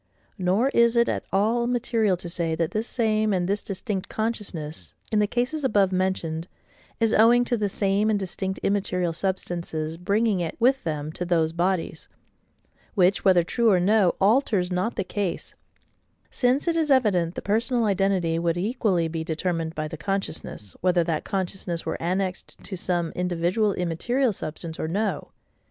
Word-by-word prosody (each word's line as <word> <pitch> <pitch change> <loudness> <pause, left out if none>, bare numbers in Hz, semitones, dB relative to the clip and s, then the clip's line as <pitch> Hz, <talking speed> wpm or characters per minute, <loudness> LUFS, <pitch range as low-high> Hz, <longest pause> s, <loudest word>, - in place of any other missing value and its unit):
Nor 190 +8 +2
is 235 -3 +3
it 235 0 +4
at - - -2
all 225 +5 +2
material 230 -5 +1
to 175 - -8
say, 170 -2 -1
that 165 -1 -1
this 220 +2 -2
same, 215 -3 +1
and 180 -2 0
this 200 +2 +1
distinct 195 0 -4
consciousness, 200 -9 -4 0.2
in 215 - +3
the 210 - +3
cases 250 +7 -1
above 205 -7 +3
mentioned, 180 -3 -1 0.5
is 225 -1 +2
owing 240 +3 +5
to 240 - +1
the 210 -3 -1
same 200 +2 +1
and 215 - +2
distinct 190 0 -3
immaterial 180 -4 0
substances, 170 -3 -3
bringing 200 +3 +1
it 170 -2 -3
with 265 +3 +3
them 150 -1 -3
to 180 - -4
those 165 -2 +1
bodies; 175 0 -1 0.9
which, 190 -1 +3
whether 185 -3 +5
true 230 +6 +2
or 190 -3 +4
no, 195 0 +3
alters 200 -3 +2
not 185 +6 -1
the - - -1
case: 185 -1 -3 0.8
since 255 +5 +2
it 335 - +2
is 320 -2 +1
evident 195 -11 +3
the - - -4
personal 230 +3 +1
identity 190 -5 +1
would 170 0 0
equally 195 -4 +1
be 160 0 -4
determined 165 0 -2
by 155 0 -2
the 160 +1 -7
consciousness, 160 - -4
whether 180 -1 +3
that 160 -2 -2
consciousness 185 -3 -3
were 160 - -3
annexed 185 +2 -2
to 195 - -5
some 175 -2 -1
individual 180 +4 0
immaterial 225 +9 0
substance 160 -1 -6
or - - -2
no. 205 +6 -2
190 Hz, 165 wpm, -25 LUFS, 170-220 Hz, 0.9 s, owing